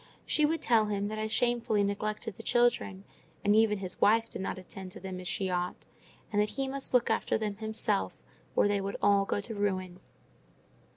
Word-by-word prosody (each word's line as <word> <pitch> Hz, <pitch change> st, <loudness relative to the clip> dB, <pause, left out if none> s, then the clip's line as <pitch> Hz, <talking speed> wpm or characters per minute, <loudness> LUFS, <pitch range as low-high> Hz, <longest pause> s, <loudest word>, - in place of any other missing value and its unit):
She 305 Hz, -1 st, +3 dB
would 325 Hz, +1 st, -1 dB
tell 225 Hz, -2 st, +4 dB
him 205 Hz, 0 st, -1 dB
that 215 Hz, 0 st, -4 dB
I 215 Hz, -, -1 dB
shamefully 225 Hz, -2 st, +1 dB
neglected 210 Hz, +1 st, -2 dB
the -, -, -9 dB
children, 240 Hz, -5 st, +1 dB, 0.4 s
and 205 Hz, +1 st, +5 dB
even 220 Hz, -1 st, +4 dB
his 185 Hz, -2 st, -5 dB
wife 225 Hz, +2 st, +4 dB
did -, -, -5 dB
not 190 Hz, -, -3 dB
attend 185 Hz, 0 st, -8 dB
to 210 Hz, -, -9 dB
them 185 Hz, -1 st, -6 dB
as 180 Hz, -, -7 dB
she 190 Hz, -, -1 dB
ought; 180 Hz, -1 st, -2 dB, 0.5 s
and 205 Hz, -, +4 dB
that 210 Hz, -, +1 dB
he 270 Hz, -1 st, -1 dB
must 275 Hz, 0 st, -2 dB
look 240 Hz, -2 st, +3 dB
after 220 Hz, -, +1 dB
them 210 Hz, -2 st, -3 dB
himself, 220 Hz, -, 0 dB, 0.4 s
or -, -, +4 dB
they 205 Hz, -1 st, +1 dB
would 200 Hz, +1 st, -3 dB
all 200 Hz, -1 st, +4 dB
go 200 Hz, -, -1 dB
to 225 Hz, +3 st, -6 dB
ruin. 185 Hz, -3 st, -2 dB
205 Hz, 205 wpm, -30 LUFS, 195-225 Hz, 0.5 s, and